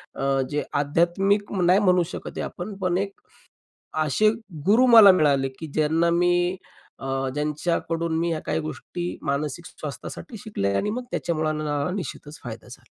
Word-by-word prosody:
अ, - - -4 0.3
जे 150 - 0
आध्यात्मिक 175 +8 +1
म 190 - -1
नाही 185 +3 +5
म्हणू 180 -3 +4
शकत - - -6
हे - - -1
आपण, 195 +3 -6
पण 180 -2 0
एक 195 0 -2 0.9
अशे 215 +9 +3 0.4
गुरु 235 +6 +5
मला 225 -5 +9
मिळाले 140 -6 +3
की 160 - -5
ज्यांना 160 +2 +2
मी 175 +1 +2 0.4
अ, 135 - -7 0.3
ज्यांच्याकडून 165 +2 -1
मी 170 +1 0
ह्या 160 - -1
काही - - 0
गोष्टी 175 +3 -5
मानसिक 150 +3 -2
स्वास्थ्यासाठी 155 - -8
शिकलोय 100 - -2
आणि 210 - 0
मग 250 +3 -4
त्याच्यामुळे 155 -2 -1
अ, 150 0 -1
निश्चितच 150 -4 -7
फायदा 115 0 -8
झाला. 125 0 -12
170 Hz, 155 wpm, -24 LUFS, 150-190 Hz, 0.9 s, मला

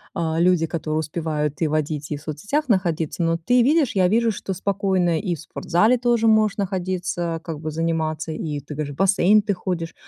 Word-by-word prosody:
э, - - -3 0.2
люди, 175 -1 +3
которые 155 -1 -2
успевают 155 -1 -3
и 160 - +3
водить, 150 -1 -2
и 150 - -2
в - - -13
соцсетях 205 - -3
находиться. 170 -6 0
Но 165 0 +1
ты 245 +10 +2
видишь, 285 0 +2
я 185 -2 +4
вижу, 225 +4 +2
что 195 -1 -4
спокойно 190 -3 0
и 180 -4 -2
в 155 - -11
спортзале 195 +9 +1
тоже 235 -2 +2
можешь 215 -2 +4
находиться, 180 -3 -2
как 160 -3 -6
бы 155 0 -4
заниматься. 160 0 -2
И 155 -2 -4
ты 145 +2 -9
говоришь 145 -1 -4
в - - -13
бассейн 195 +2 +4
ты 205 0 -1
ходишь, 175 -3 -4
175 Hz, 195 wpm, -22 LUFS, 155-200 Hz, 0.2 s, я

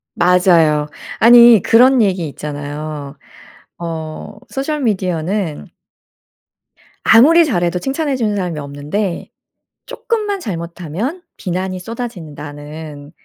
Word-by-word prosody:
맞아요. 170 -5 +3 0.3
아니 235 -2 +8
그런 250 +2 +5
얘기 185 -5 0
있잖아요. 145 0 -6 0.6
어 165 +3 -6
'소셜 290 +2 -3
미디어는' 185 - -2 1.4
"아무리 320 +9 +6
잘해도 175 - 0
칭찬해 275 - -2
주는 215 -5 -1
사람이 175 -5 -3
없는데 150 +7 -4 0.6
쪼끔만 430 -5 -3
잘못하면 180 - -5 0.2
비난이 185 0 -3
쏟아진다."는 150 - -8
180 Hz, 235 characters per minute, -17 LUFS, 155-235 Hz, 1.4 s, 아니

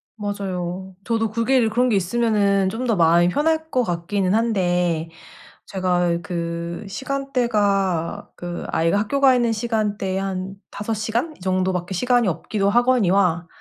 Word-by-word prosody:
맞아요. 190 -3 -4
저도 225 -2 0
그게를 230 +1 +2
그런 245 +3 +2
게 220 - +2
있으면은 200 -1 +2
좀 240 +5 -3
더 225 - +2
마음이 170 0 +4
편할 320 - 0
것 255 -5 +1
같기는 185 +1 -1
한데 180 -7 +1 0.6
제가 180 -2 0
그 170 +1 -4
시간대가 210 -8 -1
그 175 0 -6
아이가 165 +5 +2
학교 275 +7 -1
가 270 -2 +6
있는 235 -2 +1
시간대에 210 -4 -1
한 190 0 -4 0.2
5 210 +2 -4
시간 230 +9 -2
이 - - -27
정도밖에 185 0 -1
시간이 245 +3 +2
없기도 200 +4 -1
하거니와 200 -7 +3
200 Hz, 290 characters per minute, -22 LUFS, 180-230 Hz, 0.6 s, 가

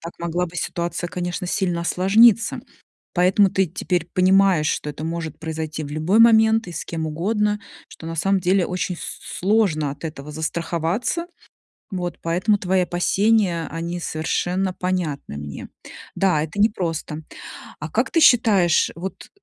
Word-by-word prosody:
Так 170 - -8
могла 170 +1 -1
бы 170 - -14
ситуация, 175 0 -3
конечно, 180 0 -4
сильно 180 -4 0
осложниться. 210 +6 +4 0.5
Поэтому 190 +2 +4
ты 190 +1 +1
теперь 175 0 -2
понимаешь, 185 -3 +4
что 150 - -1
это 150 +2 -7
может 165 -2 -4
произойти 160 -1 -4
в - - -7
любой 165 +8 +1
момент 225 -1 +5
и 175 - -8
с 165 - -5
кем 160 -1 -4
угодно, 210 +6 0 0.3
что 165 - -12
на 165 - -5
самом 195 +4 +2
деле 185 0 +2
очень 180 0 -3
с - - -7
сложно 180 -8 +1
от 145 - -14
этого 150 -2 -7
застраховаться. 170 - -2 0.7
Вот. 175 -1 -4
Поэтому 180 +5 +1
твои 185 -1 +1
опасения 180 0 +1
они 170 +1 -4
совершенно 180 +4 -1
понятны 175 - -3
мне. 75 -1 -7 0.5
Да, 180 -6 +2
это 160 +5 -6
непросто. 165 -7 -1 0.6
А - - -5
как - - 0
ты 335 - +2
считаешь, 210 - +4
вот, 185 +4 -7
175 Hz, 150 wpm, -22 LUFS, 165-195 Hz, 0.7 s, момент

